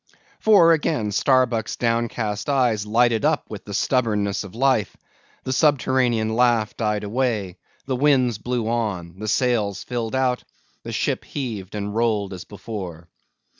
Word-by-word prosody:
For 195 -6 +6
again 145 -9 0
Starbuck's 125 0 +2
downcast 115 -2 -1
eyes 120 -7 +1
lighted 115 +1 +2
up 155 0 +1
with 105 - -8
the 100 - -7
stubbornness 105 -7 0
of 100 0 -11
life; 130 -4 +1 0.5
the 130 - -2
subterranean 125 -6 +2
laugh 120 -3 +2
died 105 -2 -1
away; 105 -5 -2 0.3
the 130 - -1
winds 130 -5 +2
blew 120 -1 -2
on; 100 -7 -2
the 110 - -5
sails 110 -4 0
filled 120 -1 -3
out; 130 -1 +1 0.4
the - - -7
ship - - -1
heaved 110 -9 -5
and 105 0 -3
rolled 110 -4 0
as 90 - -8
before. 95 -5 -8
115 Hz, 140 wpm, -23 LUFS, 105-125 Hz, 0.5 s, For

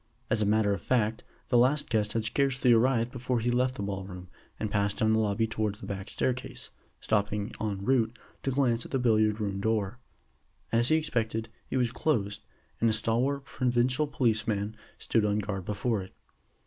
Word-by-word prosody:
As 110 - +3
a 105 - +2
matter 105 -1 +3
of - - -4
fact, 115 -3 0 0.3
the 120 - +5
last 140 +4 +3
guest 105 -2 0
had 115 -1 -1
scarcely 135 +1 +3
arrived 120 0 +3
before 125 -1 -1
he 120 +2 0
left 125 +1 +1
the 100 - -4
ball 100 -1 -3
room, 90 -1 -9 0.3
and 110 - -2
passed 100 -1 +1
down 110 0 +3
the 110 - +3
lobby 110 +1 +1
towards 110 -2 -2
the - - -8
back 100 0 -5
stair 130 - +1
case, 125 - -8 0.3
stopping 105 0 0
en 100 -3 -2
route 120 -2 +2 0.2
to - - -1
glance 125 -3 +1
at - - -9
the 135 - 0
billiard 110 -3 +3
room 100 -2 -2
door. 110 +1 0 0.7
As 115 +1 +3
he 155 - +5
expected, 115 -7 -1 0.2
it - - -1
was 120 -2 +1
closed, 105 -9 -1 0.4
and 115 - +3
a - - +2
stalwart 120 +6 +1
provincial 130 +3 +1
policeman 110 -6 0 0.2
stood 115 - +1
on 105 0 +1
guard 100 -3 -3
before 105 +1 -1
it. 95 - -11
110 Hz, 190 wpm, -29 LUFS, 105-125 Hz, 0.7 s, the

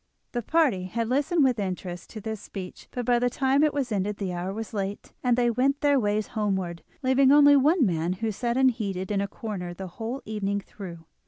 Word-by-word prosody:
The 240 - -2
party 255 - +2
had 230 +4 -2
listened 290 +5 +2
with 255 -4 +2
interest 180 -2 -4
to 220 - -8
this 220 -1 -5
speech, 185 -3 -8
but 245 -1 -4
by 240 0 +3
the 245 +1 +2
time 270 +3 +2
it 305 - +4
was 275 -5 -2
ended 205 0 -1
the 190 -3 -3
hour 175 +2 -3
was 220 +3 -6
late, 200 -1 -4
and 245 -1 +3
they 240 -1 +3
went 270 +4 +1
their 285 -2 +4
ways 210 -2 0
homeward, 190 -6 -2 0.2
leaving 260 +1 +4
only 285 0 +8
one 290 +2 +4
man 170 -2 0
who 190 +5 -4
had 220 - 0
sat 240 +3 -1
unheeded 215 -8 +1
in 200 -1 +1
a 200 - -1
corner 190 -4 -6
the 190 - -6 0.2
whole 240 +5 -3
evening 205 -2 -1
through. 180 -4 -10
220 Hz, 220 wpm, -26 LUFS, 195-260 Hz, 0.2 s, only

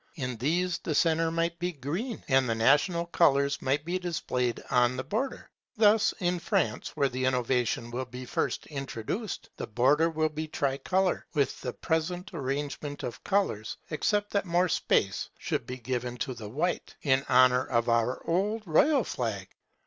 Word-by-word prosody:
In 125 -6 -3
these 170 +7 0
the 155 - -3
centre 165 +1 +3
might 165 +1 -1
be 175 +1 -1
green, 170 - -4
and 130 -3 +3
the 115 - +1
national 170 +9 +3
colours 140 -5 +2
might 140 +3 0
be 180 +2 -1
displayed 125 -9 -1
on 125 -1 +3
the 130 - -2
border. 225 - -3 0.3
Thus, 215 0 +5
in 180 -1 0
France, 170 - -1
where 140 - +3
the 130 0 -3
innovation 125 -2 0
will 130 +2 -3
be 125 +1 -8
first - - -2
introduced, 140 - -5
the - - -4
border 135 +9 +3
would 155 -1 0
be 155 +1 -3
tricolour, 155 +6 0
with 140 -2 0
the 125 - -4
present 175 +4 -2
arrangement 145 0 -3
of 120 - -6
colours, 190 - 0
except 205 +6 0
that 200 -1 0
more 175 +1 +2
space 95 -9 +1
should - - -3
be 125 - -5
given 125 0 -3
to 130 +2 -3
the 110 -4 -8
white, 155 +10 -2
in 135 -2 +3
honour 125 0 +5
of 115 -2 0
our 115 +2 +1
old 205 +6 0
royal 255 - +4
flag. 105 - -3
145 Hz, 165 wpm, -29 LUFS, 125-175 Hz, 0.3 s, Thus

